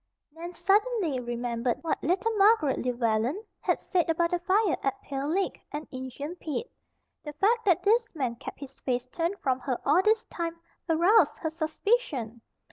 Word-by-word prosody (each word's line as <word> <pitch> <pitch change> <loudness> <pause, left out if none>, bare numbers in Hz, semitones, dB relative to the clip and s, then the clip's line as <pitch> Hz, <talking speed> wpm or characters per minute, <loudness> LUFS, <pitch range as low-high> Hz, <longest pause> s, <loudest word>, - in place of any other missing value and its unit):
Nan 335 +3 -7
suddenly 390 - +1
remembered 240 +1 -2
what 325 - -1
little 390 +8 +1
Margaret 400 - +4
Llewellen 240 - 0 0.2
had - - 0
said 355 -3 0
about 335 +1 +2
the 355 - +1
fire 385 +1 +2
at 270 -1 -1
Pale 275 0 -3
Lick, 375 +5 -1
and 300 +1 -5
"Injun 260 +5 -6
Pete." 335 - -4 0.5
The 295 - -6
fact 445 +9 +2
that 365 -5 +3
this 450 -1 +2
man 255 -6 -1
kept - - -8
his 270 -1 -10
face 250 -1 -1
turned 340 +7 -2
from 260 -6 0
her 255 -2 -2
all 300 +6 +5
this 435 +3 +3
time 335 -1 -5 0.3
aroused 345 +7 +4
her 320 - -3
suspicion. 315 - -1
325 Hz, 165 wpm, -28 LUFS, 260-390 Hz, 0.5 s, all